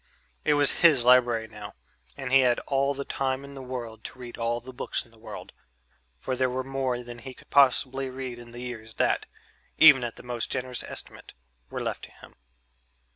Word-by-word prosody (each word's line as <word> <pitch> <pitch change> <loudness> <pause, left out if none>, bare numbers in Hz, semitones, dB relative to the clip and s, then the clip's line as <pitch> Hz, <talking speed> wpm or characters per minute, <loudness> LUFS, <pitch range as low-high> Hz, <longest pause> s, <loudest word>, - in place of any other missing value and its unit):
It 150 - +3
was 145 -1 +3
his 155 -8 +6
library 120 -3 +5
now, 105 -1 -10 0.4
and 135 -2 -5
he 135 - +7
had 125 -2 +4
all 140 0 +1
the 140 0 -4
time 135 0 -1
in 140 - -11
the 135 - -8
world 120 -4 -6
to - - -8
read 125 -1 -8
all 115 +1 -1
the 130 +2 -11
books - - -3
in 120 - -23
the 115 - -21
world 115 - -9 0.6
for 130 - -3
there 130 0 +1
were 130 +1 -2
more 130 -2 -2
than 120 0 -9
he 130 +2 -9
could - - -18
possibly 135 -1 +4
read 130 -2 -6
in 120 0 -12
the 120 +1 -9
years 110 -3 -7
that, - - +1 0.5
even 145 -5 +8
at 120 -1 -4
the - - -12
most 120 -1 -3
generous 130 -1 -2
estimate, - - -9 0.3
were - - -4
left - - -3
to - - -17
him. - - -16
125 Hz, 205 wpm, -27 LUFS, 120-135 Hz, 0.6 s, even